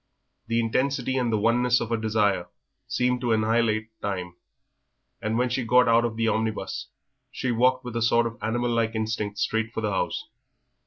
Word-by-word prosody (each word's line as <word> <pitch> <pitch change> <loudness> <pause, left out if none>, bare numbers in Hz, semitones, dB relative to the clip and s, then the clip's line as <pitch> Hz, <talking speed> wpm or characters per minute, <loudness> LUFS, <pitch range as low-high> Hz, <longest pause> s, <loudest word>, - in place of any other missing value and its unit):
The 115 0 +1
intensity 130 +3 0
and 125 -3 +1
the 110 - +2
oneness 120 +3 +3
of 115 - -4
her 115 - +1
desire 105 -5 +1 0.4
seemed 125 0 0
to 120 -2 +1
annihilate 110 0 +1
time, 90 -3 -4 0.9
and 110 0 -1
when 125 +1 +2
she 125 +1 -1
got 125 +2 +4
out 115 +1 +4
of 115 -2 -2
the 115 0 0
omnibus 110 -3 -2 0.4
she 130 - -2
walked 125 +2 +2
with 120 -1 -6
a 115 - 0
sort 115 +1 +3
of 115 0 -3
animal 120 +2 0
like 115 -1 0
instinct 110 -2 -2
straight 110 +2 0
for 110 - -4
the 105 -1 -1
house. 95 - -2
115 Hz, 180 wpm, -26 LUFS, 110-120 Hz, 0.9 s, got